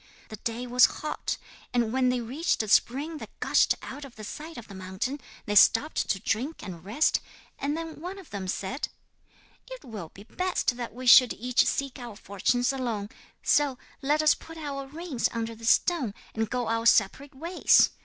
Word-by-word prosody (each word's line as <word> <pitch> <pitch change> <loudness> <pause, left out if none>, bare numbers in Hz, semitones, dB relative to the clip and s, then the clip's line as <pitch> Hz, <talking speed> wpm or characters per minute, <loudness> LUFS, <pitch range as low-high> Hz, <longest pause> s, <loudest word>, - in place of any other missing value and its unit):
The 215 - -7
day 230 +3 -4
was 250 0 +6 0.2
hot, 305 - -2 0.4
and 235 -2 +1
when 255 -1 +3
they 250 -1 0
reached 260 +3 0
a - - -6
spring 285 +9 +2
that - - -11
gushed - - +3
out 285 +2 -7
of 270 -3 -11
the 215 - -10
side 310 +9 -7
of 235 - -9
the 200 - -11
mountain, 190 +9 -4 0.3
they 205 - -2
stopped 225 +8 +5
to 195 - +1
drink 260 +12 -2
and 175 -3 -8
rest, 225 +11 +2 0.4
and 290 +2 -1
then 325 -2 -6
one 365 +3 -6
of 380 -5 -13
them 195 -2 -4
said: 200 +8 -3 0.8
'"It - - -9
will 210 -9 -7
be 200 - -14
best 365 - -1
that 240 -2 -6
we 255 +1 -7
should 250 0 +8
each 245 +1 +2
seek 275 -1 -2
our 240 -3 -8
fortunes 245 +7 0
alone; 230 -6 -3 0.3
so 285 -3 +3 0.2
let 295 +3 +2
us 305 - +6
put 325 0 -11
our 280 -3 -5
rings 305 -3 -2
under 230 0 -3
this 225 +1 -2
stone, 275 - +2 0.2
and 225 -1 -1
go 250 -1 -1
our 230 0 +1
separate 265 +7 +3
ways. 335 +6 +4
250 Hz, 190 wpm, -27 LUFS, 225-295 Hz, 0.8 s, should